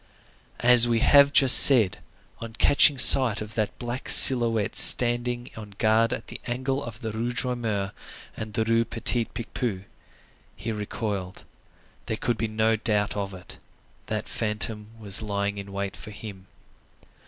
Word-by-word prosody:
As 120 Hz, 0 st, +4 dB
we 120 Hz, -1 st, -1 dB
have 140 Hz, 0 st, +3 dB
just 135 Hz, -4 st, +5 dB
said, 115 Hz, -9 st, +6 dB, 0.4 s
on 115 Hz, -1 st, -10 dB
catching 140 Hz, +4 st, +2 dB
sight 120 Hz, -3 st, +3 dB
of 105 Hz, +1 st, -9 dB
that 110 Hz, -2 st, -5 dB
black 120 Hz, +1 st, -7 dB
silhouette 115 Hz, -5 st, +6 dB
standing 120 Hz, 0 st, +2 dB
on 105 Hz, -2 st, -13 dB
guard 110 Hz, +1 st, 0 dB
at -, -, -6 dB
the -, -, -11 dB
angle 130 Hz, +3 st, -5 dB
of 115 Hz, 0 st, -11 dB
the 110 Hz, -2 st, -6 dB
Rue 115 Hz, +3 st, -5 dB
Droit 125 Hz, +1 st, -4 dB
Mur 105 Hz, -4 st, -5 dB, 0.4 s
and 110 Hz, -1 st, -9 dB
the 110 Hz, -, -1 dB
Rue 115 Hz, +1 st, -1 dB
Petit 115 Hz, 0 st, -3 dB
Picpus, 115 Hz, -4 st, -7 dB, 0.7 s
he 115 Hz, -, -7 dB
recoiled. 105 Hz, -3 st, -7 dB, 0.6 s
There 110 Hz, -, -5 dB
could 120 Hz, 0 st, -4 dB
be 115 Hz, -, -3 dB
no 110 Hz, +1 st, -2 dB
doubt 105 Hz, -2 st, -3 dB
of 100 Hz, -2 st, -6 dB
it. 90 Hz, -, -13 dB, 0.5 s
That -, -, -6 dB
phantom 105 Hz, -1 st, -6 dB
was 100 Hz, -2 st, +1 dB
lying 100 Hz, -1 st, -5 dB
in 100 Hz, 0 st, -11 dB
wait 100 Hz, 0 st, -7 dB
for -, -, -13 dB
him. 100 Hz, -3 st, -12 dB
110 Hz, 155 wpm, -23 LUFS, 105-120 Hz, 0.7 s, said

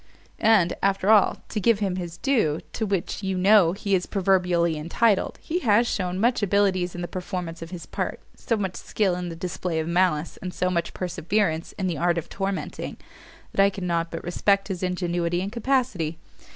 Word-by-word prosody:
And, 210 Hz, -6 st, +4 dB
after 195 Hz, +1 st, +2 dB
all, 210 Hz, -2 st, +5 dB
to 215 Hz, -, -2 dB
give 230 Hz, +1 st, +3 dB
him 195 Hz, -3 st, -1 dB
his 175 Hz, -2 st, -5 dB
due, 215 Hz, -, +1 dB
to 220 Hz, -, -2 dB
which, 195 Hz, 0 st, -2 dB
you 190 Hz, -1 st, -2 dB
know, 190 Hz, -2 st, +5 dB
he 200 Hz, 0 st, -2 dB
is 180 Hz, -2 st, +2 dB
even -, -, -22 dB
proverbially 180 Hz, -4 st, +2 dB
entitled, 190 Hz, +7 st, +1 dB
he 345 Hz, +3 st, -2 dB
has 230 Hz, -, +3 dB
shewn 185 Hz, -3 st, -2 dB
such 235 Hz, +3 st, +2 dB
abilities 190 Hz, -3 st, +1 dB
in 175 Hz, -, -5 dB
the 175 Hz, -, -3 dB
performance 180 Hz, -2 st, -5 dB
of 165 Hz, -, -7 dB
his 180 Hz, -2 st, -7 dB
part, -, -, -3 dB, 0.2 s
so 230 Hz, -, -1 dB
much 190 Hz, -3 st, -3 dB
skill 200 Hz, -4 st, 0 dB
in 180 Hz, 0 st, -3 dB
the 165 Hz, -, -6 dB
display 175 Hz, -1 st, -3 dB
of 160 Hz, -, -2 dB
malice, 170 Hz, -2 st, +1 dB
and 180 Hz, -1 st, -6 dB
so 180 Hz, 0 st, 0 dB
much 170 Hz, -2 st, -2 dB
perseverance 175 Hz, -1 st, -1 dB
in 190 Hz, -, -3 dB
the 170 Hz, -6 st, -1 dB
art 175 Hz, -1 st, +2 dB
of 170 Hz, -, -4 dB
tormenting, 195 Hz, -1 st, -4 dB, 0.5 s
that 195 Hz, -, +4 dB
I 200 Hz, -, +5 dB
cannot 170 Hz, -4 st, -2 dB
but 165 Hz, -, -6 dB
respect 195 Hz, +3 st, +1 dB
his 185 Hz, -3 st, -3 dB
ingenuity 175 Hz, -1 st, -1 dB
and 195 Hz, +2 st, -3 dB
capacity. 235 Hz, -, 0 dB
185 Hz, 195 wpm, -25 LUFS, 175-200 Hz, 0.5 s, all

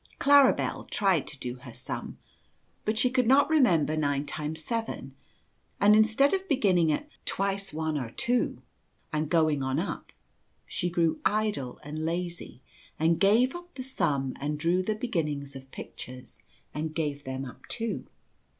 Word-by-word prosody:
Claribel 285 Hz, -2 st, +4 dB
tried 190 Hz, -7 st, +2 dB
to 145 Hz, -, -8 dB
do 125 Hz, -1 st, -5 dB
her 125 Hz, -, -11 dB
sum, -, -, -6 dB, 0.7 s
but 215 Hz, +1 st, 0 dB
she 250 Hz, -, +4 dB
could 255 Hz, -3 st, +2 dB
not 280 Hz, +5 st, +5 dB
remember 175 Hz, -, +4 dB
9 145 Hz, -2 st, 0 dB
times 155 Hz, +2 st, -4 dB
7, 230 Hz, +5 st, -3 dB, 0.7 s
and 210 Hz, +1 st, +6 dB
instead 220 Hz, -, +4 dB
of 385 Hz, 0 st, -1 dB
beginning 185 Hz, -, +3 dB
at 225 Hz, -, -2 dB
" -, -, -41 dB
twice 195 Hz, 0 st, -1 dB
one 155 Hz, -1 st, -1 dB
are 125 Hz, -4 st, -4 dB
two 240 Hz, -, 0 dB, 0.2 s
" -, -, -37 dB
and 155 Hz, 0 st, 0 dB
going 155 Hz, -4 st, +3 dB
on 130 Hz, +1 st, -1 dB
up, 175 Hz, +5 st, -3 dB, 0.5 s
she 175 Hz, -, -2 dB
grew 165 Hz, -2 st, +1 dB
idle 210 Hz, -, 0 dB
and 150 Hz, +2 st, -6 dB
Jazy 170 Hz, -4 st, -3 dB, 0.4 s
and 165 Hz, +1 st, +2 dB
gave 230 Hz, -, +4 dB
up 350 Hz, 0 st, -10 dB
the 255 Hz, -, -5 dB
sum 140 Hz, -, -1 dB
and 150 Hz, +1 st, -2 dB
drew 170 Hz, +4 st, +2 dB
the 215 Hz, +3 st, -1 dB
beginnings 150 Hz, -, -2 dB
of 135 Hz, 0 st, -10 dB
pictures 125 Hz, -1 st, -10 dB, 0.3 s
andgave 150 Hz, -2 st, -2 dB
them 130 Hz, 0 st, -4 dB
up 125 Hz, -, -12 dB
too. 230 Hz, -1 st, -3 dB
165 Hz, 160 wpm, -28 LUFS, 145-220 Hz, 0.7 s, and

